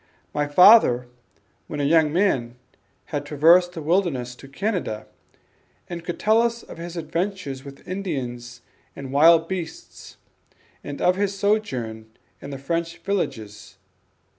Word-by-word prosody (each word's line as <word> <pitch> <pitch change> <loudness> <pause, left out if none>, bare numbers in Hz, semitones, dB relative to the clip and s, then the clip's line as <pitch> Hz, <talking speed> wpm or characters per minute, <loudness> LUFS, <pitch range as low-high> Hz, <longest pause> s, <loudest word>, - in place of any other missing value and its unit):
My 145 0 0
father 145 - +6 0.6
when 150 - -5
a - - 0
young 155 +1 +3
man 135 -10 0 0.6
had 145 -1 -1
traversed 170 +5 +4
the 160 - -7
wilderness 150 -8 0
to 135 - -13
Canada, 165 - -3 0.8
and 170 -1 -7
could 175 0 -5
tell 220 +2 +4
us 235 0 -1
of - - -12
his 170 +1 -7
adventures 165 -4 -3
with 140 -1 -13
Indians 125 -10 -5 0.3
and 135 -1 -8
wild 165 +3 +6
beasts, 170 -3 -7 0.7
and 145 -1 -6
of 180 +1 +3
his 200 0 -1
sojourn 130 - -1 0.3
in 140 - -8
the 140 - -6
French 165 +5 -3
villages. 125 - -4
165 Hz, 135 wpm, -23 LUFS, 135-185 Hz, 0.8 s, father